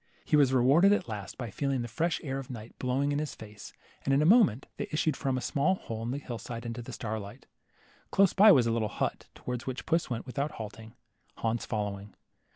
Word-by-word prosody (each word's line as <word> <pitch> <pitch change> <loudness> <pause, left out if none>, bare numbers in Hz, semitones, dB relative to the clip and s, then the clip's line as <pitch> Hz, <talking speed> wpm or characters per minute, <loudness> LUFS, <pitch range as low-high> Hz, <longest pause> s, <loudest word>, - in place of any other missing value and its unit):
He - - +2
was 140 -3 +5
rewarded 140 +10 +5
at 205 - 0
last 105 -4 -6
by 120 -4 -5
feeling 135 +1 -1
the - - -4
fresh 160 +9 -1
air 135 -2 -3
of 135 - -8
night 115 -3 -8
blowing 135 +3 0
in 145 - 0
his 150 -2 -4
face, 105 -2 -11 0.3
and 135 - 0
in 140 - +3
a - - +2
moment 190 - +5
they - - -3
issued 155 -1 0
from 135 -2 -1
a - - -2
small 155 +8 +1
hole 115 -10 -6
in 115 - -3
the 130 - -2
hill 120 -5 -6
side 115 0 -7
into 120 +1 -4
the 115 - -8
starlight. 105 -3 -6 0.6
Close 195 -2 +4
by 210 +2 +8
was 130 -9 +5
a 115 - +1
little 110 -2 0
hut, - - -3
towards 125 0 -5
which 130 0 -4
puss 165 0 +1
went 120 -2 -3
without 140 +3 -3
halting, 110 +1 -9 0.4
Hans 115 +1 -1
fol 105 -2 -1
lowing. 100 0 -10
125 Hz, 230 wpm, -30 LUFS, 115-145 Hz, 0.6 s, by